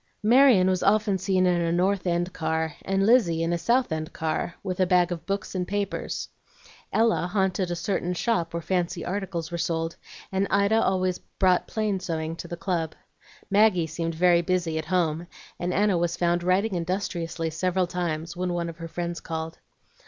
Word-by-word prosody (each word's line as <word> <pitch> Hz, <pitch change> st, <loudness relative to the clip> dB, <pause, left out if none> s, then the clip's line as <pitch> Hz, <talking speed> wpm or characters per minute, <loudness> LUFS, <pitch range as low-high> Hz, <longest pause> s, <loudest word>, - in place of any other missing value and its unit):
Marion 235 Hz, -4 st, +6 dB
was 185 Hz, -1 st, +1 dB
often 205 Hz, -1 st, +2 dB
seen 185 Hz, 0 st, +2 dB
in 175 Hz, -1 st, +2 dB
a 165 Hz, 0 st, 0 dB
North 185 Hz, +2 st, +1 dB
End 175 Hz, +1 st, 0 dB
car, 160 Hz, -1 st, -1 dB
and 195 Hz, 0 st, +1 dB
Lizzie 185 Hz, -9 st, +4 dB
in 165 Hz, +1 st, 0 dB
a -, -, +1 dB
South 240 Hz, +7 st, +2 dB
End 155 Hz, 0 st, -3 dB
car, 160 Hz, +2 st, -2 dB
with 185 Hz, -2 st, -3 dB
a 185 Hz, -, +3 dB
bag 180 Hz, -1 st, +3 dB
of 170 Hz, -2 st, -5 dB
books 195 Hz, 0 st, -3 dB
and 180 Hz, -2 st, -2 dB
papers. 205 Hz, -1 st, -3 dB, 0.6 s
Ella 220 Hz, -5 st, +2 dB
haunted 190 Hz, -2 st, 0 dB
a 175 Hz, -, -1 dB
certain 180 Hz, 0 st, -2 dB
shop 175 Hz, -5 st, 0 dB
where 170 Hz, -1 st, -4 dB
fancy 175 Hz, -2 st, -1 dB
articles 180 Hz, -3 st, -3 dB
were 170 Hz, -, -3 dB
sold, 165 Hz, 0 st, -2 dB, 0.3 s
and 195 Hz, +1 st, 0 dB
Ida 200 Hz, +3 st, +3 dB
always 185 Hz, -1 st, +1 dB
brought 185 Hz, -2 st, +1 dB
plain 215 Hz, -3 st, -1 dB
sewing 165 Hz, -3 st, -3 dB
to 170 Hz, -, -7 dB
the 170 Hz, -, -6 dB
club. 170 Hz, -4 st, -2 dB, 0.6 s
Maggie 200 Hz, -4 st, +4 dB
seemed 165 Hz, +1 st, -3 dB
very 175 Hz, 0 st, +4 dB
busy 170 Hz, -2 st, 0 dB
at 155 Hz, -, -5 dB
home, 170 Hz, -2 st, 0 dB, 0.3 s
and 175 Hz, +1 st, -1 dB
Anna 200 Hz, -2 st, +2 dB
was 170 Hz, 0 st, -1 dB
found 175 Hz, 0 st, +1 dB
writing 190 Hz, +4 st, +1 dB
industriously 170 Hz, -2 st, -2 dB
several 185 Hz, +3 st, 0 dB
times 170 Hz, -2 st, -3 dB
when 180 Hz, 0 st, -2 dB
one 170 Hz, -1 st, -2 dB
of 165 Hz, -, -9 dB
her 165 Hz, -1 st, -6 dB
friends 170 Hz, +1 st, -4 dB
called. 160 Hz, 0 st, -5 dB
180 Hz, 185 wpm, -26 LUFS, 170-190 Hz, 0.6 s, Marion